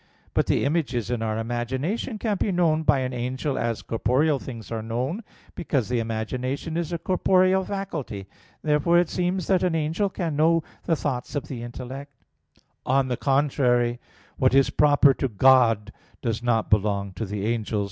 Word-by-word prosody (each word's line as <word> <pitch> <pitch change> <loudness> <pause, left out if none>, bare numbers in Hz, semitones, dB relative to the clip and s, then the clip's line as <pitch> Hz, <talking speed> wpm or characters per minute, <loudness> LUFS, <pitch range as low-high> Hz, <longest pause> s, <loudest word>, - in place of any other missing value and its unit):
But - - +1
the - - +2
images 140 -7 -1
in 120 -2 -1
our 110 -1 -1
imagination 130 - -2
can 210 -2 -1
be 200 - 0
known 165 -3 +2
by 145 -4 +3
an 130 0 -2
angel 130 +4 -2
as 115 -2 -2
corporeal 135 +6 +1
things 115 -5 -9
are 115 -1 -2
known: 125 - -3 0.3
because 135 -9 -1
the 125 -1 +1
imagination 125 +7 -3
is 170 -1 -2
a 170 - -1
corporeal 185 +2 +2
faculty. 155 - -5 0.4
Therefore 155 +3 +3
it 175 -1 +3
seems 180 0 -1
that 190 -2 +2
an 180 -3 +1
angel 160 +6 0
can 170 -5 -3
know 165 +2 +3 0.2
the 165 - +2
thoughts 140 -2 -3
of 145 - -3
the 125 -4 -5
intellect. 130 +4 -7 0.7
On 130 0 +1
the 125 - 0
contrary, 125 -4 +2 0.4
What 130 0 +3
is 135 -1 +4
proper 145 -2 +5
to 135 - -1
God 115 -2 +4 0.3
does 115 -2 -1
not 115 -2 0
belong 100 -2 +1
to 110 - -4
the 100 0 -3
angels. 110 -2 -1
135 Hz, 170 wpm, -25 LUFS, 120-160 Hz, 0.7 s, proper